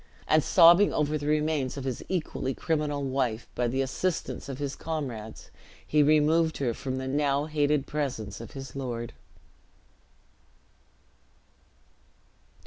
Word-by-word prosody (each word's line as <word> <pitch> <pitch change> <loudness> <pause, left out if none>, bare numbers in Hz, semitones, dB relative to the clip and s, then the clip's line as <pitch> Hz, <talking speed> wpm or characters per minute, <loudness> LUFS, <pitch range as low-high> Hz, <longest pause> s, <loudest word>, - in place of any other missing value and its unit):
and 155 -1 +4
sobbing 175 +3 +7
over 150 0 0
the 145 -1 -3
remains 150 -3 0
of 140 - -4
his 130 -3 -4
equally 155 -7 -2
criminal 150 -3 -1
wife, 130 -4 -1
by 120 0 0
the 130 +3 0
assistance 160 +2 -3
of 135 - -5
his 140 -1 -3
comrades 125 -9 -6 0.3
he 150 - +3
removed 155 +2 +3
her 125 -4 0
from 130 +3 -4
the 130 0 -4
now 140 +1 +1
hated 150 -2 +1
presence 125 -10 -4
of 115 - -10
his 135 -1 -8
lord. 120 -4 -4
140 Hz, 130 wpm, -28 LUFS, 130-150 Hz, 0.3 s, sobbing